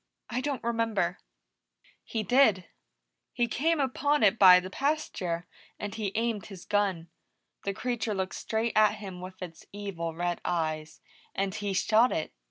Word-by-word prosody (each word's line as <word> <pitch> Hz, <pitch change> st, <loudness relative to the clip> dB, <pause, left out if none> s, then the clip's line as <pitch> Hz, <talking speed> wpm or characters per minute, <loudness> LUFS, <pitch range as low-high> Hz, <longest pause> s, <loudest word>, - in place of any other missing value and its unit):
"I 245 Hz, +2 st, -1 dB
don't 280 Hz, -1 st, -3 dB
remember." 225 Hz, -6 st, 0 dB, 0.8 s
"He 220 Hz, -2 st, -3 dB
did. 220 Hz, -6 st, +4 dB, 0.7 s
He 240 Hz, -, +1 dB
came 315 Hz, +7 st, +1 dB
upon 285 Hz, +1 st, +1 dB
it 215 Hz, +2 st, +4 dB
by 185 Hz, -2 st, +9 dB
the 185 Hz, +1 st, -7 dB
pasture, 190 Hz, -, -1 dB, 0.3 s
and 205 Hz, -1 st, -5 dB
he 215 Hz, -3 st, -2 dB
aimed 225 Hz, -3 st, -1 dB
his 195 Hz, -4 st, -10 dB
gun. 195 Hz, -5 st, 0 dB, 0.6 s
The 200 Hz, -, 0 dB
creature 235 Hz, -3 st, -2 dB
looked 190 Hz, -1 st, -2 dB
straight 225 Hz, +1 st, -1 dB
at 215 Hz, 0 st, +5 dB
him 190 Hz, -4 st, -8 dB
with 185 Hz, +1 st, -9 dB
its 165 Hz, -2 st, -10 dB
evil 185 Hz, -5 st, -5 dB
red 175 Hz, +1 st, -2 dB
eyes, 155 Hz, -2 st, -2 dB, 0.3 s
and 195 Hz, -1 st, -1 dB
he 205 Hz, -2 st, -2 dB
shot 220 Hz, +6 st, +4 dB
it. 155 Hz, -, -2 dB
205 Hz, 155 wpm, -29 LUFS, 180-230 Hz, 0.8 s, by